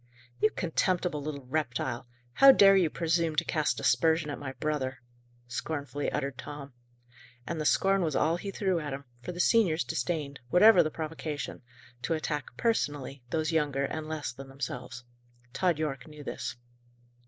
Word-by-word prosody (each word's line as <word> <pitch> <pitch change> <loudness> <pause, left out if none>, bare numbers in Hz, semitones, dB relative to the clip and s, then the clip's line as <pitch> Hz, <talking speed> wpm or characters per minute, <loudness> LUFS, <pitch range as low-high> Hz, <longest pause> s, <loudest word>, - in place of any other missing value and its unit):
"You 215 - +4
contemptible 175 -3 0
little 140 -2 -5
reptile! 125 -3 -2 0.3
How 275 - +9
dare 195 -6 +7
you 180 -4 +4
presume 165 0 0
to - - +2
cast 155 -2 0
aspersion 160 -2 +2
at - - -5
my 135 -2 -5
brother?" 135 -4 -2 0.5
scornfully 145 +2 -3
uttered 135 -1 -3
Tom. 145 -1 -8 0.7
And 160 +3 -3
the - - -3
scorn 195 0 +3
was 160 -4 0
all 165 +3 +2
he 200 - -6
threw 190 -3 0
at 150 -3 -4
him; 140 +1 -6 0.2
for 150 - -5
the 175 - -8
seniors 180 -5 +3
disdained, 145 -1 -3
whatever 185 - +7
the 155 - +1
provocation, 155 -2 -5 0.4
to 165 - 0
attack 150 -5 -4
personally 145 - -1
those 155 +3 0
younger 145 -4 +1
and 155 +2 -4
less 155 -3 -3
than 135 +2 -10
themselves. 125 -2 -6 0.5
Tod 175 +3 +1
Yorke 150 -3 -3
knew 150 -1 -11
this. - - -4
155 Hz, 160 wpm, -29 LUFS, 140-170 Hz, 0.7 s, How